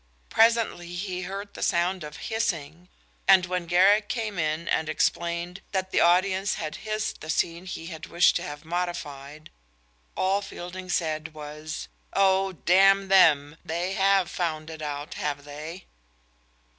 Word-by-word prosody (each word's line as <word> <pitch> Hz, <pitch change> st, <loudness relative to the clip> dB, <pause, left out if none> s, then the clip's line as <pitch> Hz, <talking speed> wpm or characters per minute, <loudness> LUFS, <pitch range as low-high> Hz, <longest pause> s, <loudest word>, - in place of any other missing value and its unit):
Presently 225 Hz, -6 st, +2 dB
he 185 Hz, 0 st, -3 dB
heard 195 Hz, +3 st, -6 dB
the -, -, -9 dB
sound 175 Hz, +1 st, +1 dB
of 150 Hz, +1 st, -8 dB
hissing, 175 Hz, -6 st, -2 dB, 0.4 s
and 190 Hz, -1 st, +7 dB
when 180 Hz, -1 st, -3 dB
Garrick 200 Hz, +5 st, +4 dB
came 220 Hz, -6 st, -3 dB
in 155 Hz, +1 st, -1 dB
and 155 Hz, -, 0 dB
explained 170 Hz, +3 st, -1 dB
that 190 Hz, -1 st, -1 dB
the -, -, +2 dB
audience 185 Hz, +3 st, +3 dB
had 155 Hz, -2 st, -5 dB
hissed 215 Hz, 0 st, -3 dB
the 155 Hz, -, -9 dB
scene 170 Hz, +3 st, -1 dB
he 165 Hz, -2 st, -6 dB
had 160 Hz, -2 st, -8 dB
wished 170 Hz, +1 st, +4 dB
to -, -, -5 dB
have 150 Hz, -2 st, -7 dB
modified, 155 Hz, -4 st, -5 dB, 0.7 s
all 195 Hz, +2 st, +2 dB
Fielding 185 Hz, -1 st, -8 dB
said 155 Hz, -2 st, -2 dB
was: 150 Hz, +1 st, -7 dB, 0.3 s
"Oh, 195 Hz, 0 st, +3 dB
damn 195 Hz, +3 st, +4 dB
them, 155 Hz, -5 st, +5 dB
they 175 Hz, +4 st, -2 dB
have 195 Hz, -1 st, +3 dB
found 160 Hz, -2 st, -3 dB
it 160 Hz, -1 st, -9 dB
out, 145 Hz, +2 st, -5 dB
have 145 Hz, -1 st, -3 dB
they!" 155 Hz, +5 st, -8 dB
175 Hz, 145 wpm, -26 LUFS, 155-190 Hz, 0.7 s, and